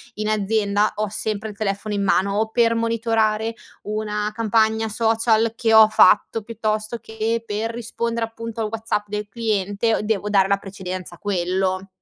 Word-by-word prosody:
in 215 0 -3
azienda 210 0 +1
ho 215 0 -1
sempre 215 +1 -3
il 210 - -10
telefono 205 0 -2
in 200 - 0
mano 195 0 +2
o 220 0 0
per 230 0 +2
monitorare 225 -1 0 0.3
una 210 0 -2
campagna 220 0 +1
social 225 0 +2
che 225 -1 +1
ho 220 0 +9
fatto, 215 0 +4
piuttosto 215 0 -2
che 220 +1 -2
per 220 +2 -2
rispondere 235 0 -3
appunto 230 0 -8
al 220 - 0
WhatsApp 220 -1 -2
del 210 0 -4
cliente 215 0 0
devo 210 -1 -1
dare 195 -2 +3
la 200 - +3
precedenza 185 -2 -7
a - - -20
quello. 185 0 -1
215 Hz, 160 wpm, -22 LUFS, 205-225 Hz, 0.3 s, ho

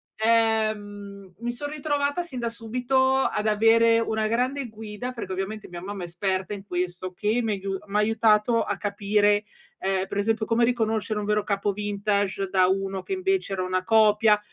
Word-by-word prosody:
ehm, 215 -3 0
mi 240 0 -2
son 290 +4 -5
ritrovata 290 +1 -1
sin 285 -8 -6
da 235 - -1
subito 250 +3 +1
ad 215 -5 0
avere 225 +2 +4
una 220 -1 0
grande 250 +3 -1
guida, 220 +3 -6
perché 230 -6 -6
ovviamente 195 +3 -4
mia 175 -1 -7
mamma 195 0 -6
è - - -3
esperta 190 +3 -2
in 200 -1 -8
questo 180 0 -3
che 215 +5 0
mi 220 -2 0
aiu 195 -1 -3
m' 200 - -8
ha 210 - +4
aiutato 220 +1 +3
a 205 - -3
capire, 205 0 +1 0.4
ehm, 190 0 -1
per 200 - -5
esempio 220 +2 +1
come 230 +1 +2
riconoscere 220 -3 0
un 210 - -3
vero 210 0 +1
capo 200 0 0
vintage 200 -1 -1
da 185 -1 +4
uno 195 0 -1
che 385 - -4
invece 375 - 0
era 185 -1 -1
una 185 0 -1
copia, 215 0 +4
210 Hz, 180 wpm, -25 LUFS, 200-230 Hz, 0.4 s, avere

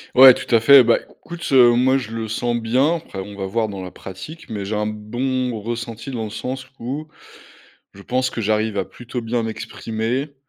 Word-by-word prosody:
Ouais, 130 0 +10
tout 120 - -5
à 115 - +6
fait. 135 +3 +8
Bah, 120 0 +3
écoute, 170 0 -10
heu, 125 -3 +7
moi 130 +2 +3
je 115 -5 -5
le 115 -1 -4
sens 120 +2 -1
bien, 125 +8 +2
après 155 -11 -9
on 100 +1 -7
va 100 -1 -4
voir 110 +3 0
dans 100 -2 -6
la 90 - -7
pratique. 95 - -10
Mais 100 -3 -4
j'ai 105 - -3
un 105 0 0
bon 120 +3 -2
ressenti 115 +3 -5
dans 115 -3 -3
le - - -6
sens 130 +5 -5
où, 140 +6 -5 0.9
je 100 - -12
pense 130 +2 0
que 115 - -5
j'arrive 110 0 0
à 95 - 0
plutôt 120 0 -7
bien 115 +1 -1
m'exprimer. 115 +5 -3
115 Hz, 205 wpm, -21 LUFS, 110-130 Hz, 0.9 s, Ouais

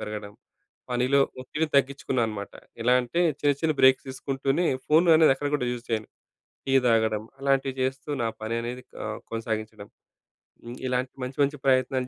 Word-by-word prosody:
పెరగడం 105 -1 -6 0.6
పనిలో 125 +3 +2 0.2
ఒత్తిడి 150 +5 -2
తగ్గించుకున్నా 135 -2 +1
అనమాట. 100 -2 -6 0.3
ఎలా 125 +2 +3
అంటే 125 +8 -2 0.2
చిన్న, 145 -1 +3
చిన్న 160 -1 +2
బ్రేక్స్ 130 +1 +5
తీసుకుంటూనే, 135 +5 -1 0.2
ఫోన్ 160 +3 +4
అనేది 155 -4 +6
ఎక్కడ 145 +1 -3
కూడా 125 -4 0
యూజ్ 120 0 -6
చేయను. 110 -1 -1 0.6
టీ 135 - 0
తాగడం 110 -2 +2 0.2
అలాంటివి 135 -1 +1
చేస్తూ 135 +3 -2
నా 115 - +1
పననేది 115 +3 -3 0.2
ఆహ్, - - -4
కొనసాగించడం. 110 -2 -4 0.8
హ్మ్. 120 +1 -8
ఇలాంటి 125 0 -1
మంచి, 130 +1 -6
మంచి 145 +1 -1
ప్రయత్నాలు 130 -1 +2
130 Hz, 150 wpm, -26 LUFS, 115-135 Hz, 0.8 s, అనేది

